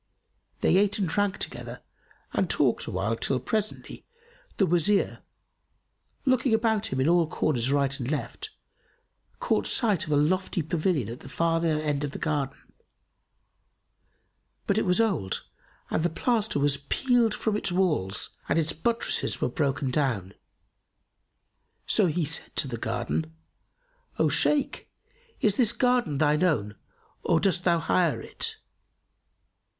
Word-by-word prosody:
They - - +4
ate 200 0 +2
and 195 -3 0
drank 200 +4 0
together - - -4 0.5
and - - 0
talked - - +1
awhile, 100 +5 -1
till, 130 +3 0
presently, 215 - -3 0.5
the 195 - +4
Wazir, 175 +4 +1 1.1
looking 255 -3 +3
about 220 -1 +1
him 130 - -3
in 130 - +2
all 170 -1 +4
corners 135 -6 0
right 140 0 +1
and 125 -1 -3
left, 150 -2 -4 0.9
caught - - 0
sight 210 -9 +2
of - - -4
a - - +3
lofty 175 +3 +1
pavilion 155 - 0
at 120 +3 -7
the 135 - -11
farther 165 0 +1
end 150 -2 -1
of 145 -1 -3
the - - -5
garden; 145 -4 -2 2.1
but 200 +2 +2
it - - -1
was 180 +3 +2
old 190 - 0 0.5
and - - +1
the 175 - +1
plaster 220 - 0
was 140 0 +2
peeled 235 - +1
from 220 -2 -1
its 210 - -1
walls 155 - 0 0.2
and - - +2
its 165 0 +1
buttresses 230 +9 0
were - - 0
broken 140 -3 -1
down. 120 -10 -1 1.5
So - - +3
he 165 0 0
said 160 +3 -1
to - - +1
the 120 -3 -4
Gardener, 140 +9 -2 0.9
"O - - +3
Shaykh, 290 -2 +1 0.5
is 210 -2 +2
this 235 -4 +4
garden 245 - +1
thine 150 +1 +2
own 110 - +1 0.5
or - - +2
dost 185 -2 +1
thou 170 -2 +4
hire 165 0 +1
it?" - - -3
165 Hz, 140 wpm, -27 LUFS, 140-205 Hz, 2.1 s, They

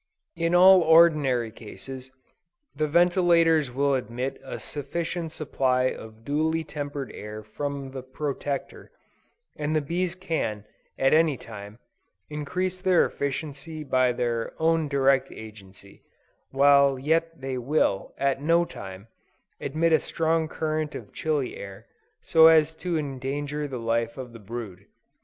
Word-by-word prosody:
In 165 +1 0
all 185 +1 +8
ordinary 155 -8 +4
cases, 125 +4 -10 0.7
the 155 +1 0
ventilators 170 -2 +4
will 140 +3 +1
admit 130 +1 -3
a 135 - -6
sufficient 165 +3 -4
supply 130 -4 0
of 110 0 -12
duly 160 +3 0
tempered 145 -3 -5
air 105 +1 -8
from 140 +4 -5
the 130 -1 -6
Protector, 140 +1 -5 0.7
and 150 +1 -2
the - - +4
bees 170 +4 -2
can, 160 - -3 0.3
at 135 - +3
any 155 -3 +4
time, 105 -2 -10 0.5
increase 180 +5 -3
their 185 -2 +4
efficiency 145 +2 -5
by 130 -3 +2
their 120 -2 -2
own 160 -1 +2
direct 135 -1 +2
agency, 100 -3 -13 0.5
while 140 0 +5
yet 165 +4 0
they 130 -1 -4
will, 125 -6 0
at 135 0 0
no 170 +3 +3
time, 95 - -9 0.5
admit 160 +4 0
a 160 - +6
strong 160 0 0
current 155 -1 -3
of - - -9
chilly 150 -5 -1
air, 100 +2 -9 0.4
so 160 -1 +7
as 160 -1 +5
to 170 +1 -3
endanger 145 +1 -3
the 130 -3 -5
life 115 +1 -1
of 125 -3 -8
the 115 - -10
brood. 105 -3 -8
140 Hz, 135 wpm, -26 LUFS, 125-160 Hz, 0.7 s, all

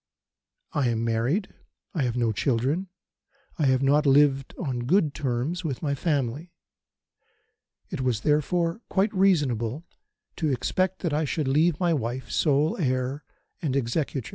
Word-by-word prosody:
"I 145 -6 +1
am 115 0 -1
married. 120 - 0 0.4
I 160 - -1
have 125 -2 -1
no 120 -2 +2
children. 135 - 0 0.7
I 150 - +3
have 130 0 +2
not 145 +2 +3
lived 135 -1 +3
on 125 -7 -3
good 160 -3 +3
terms 140 +6 -2
with 145 -4 -4
my 145 -2 0
family. 145 +2 -2 1.4
It - - -3
was, 125 -4 0
therefore, 165 - +1
quite 205 +3 +1
reasonable 150 - +1 0.5
to 155 - 0
expect 185 +10 -1
that 165 -4 0
I 155 +1 +1
should 150 0 -2
leave 155 +4 +2
my 175 -2 +2
wife 130 -2 -3
sole 150 +1 +2
heir 130 +1 -1 0.4
and 145 -6 -1
executrix. 135 0 -1
140 Hz, 140 wpm, -26 LUFS, 125-165 Hz, 1.4 s, I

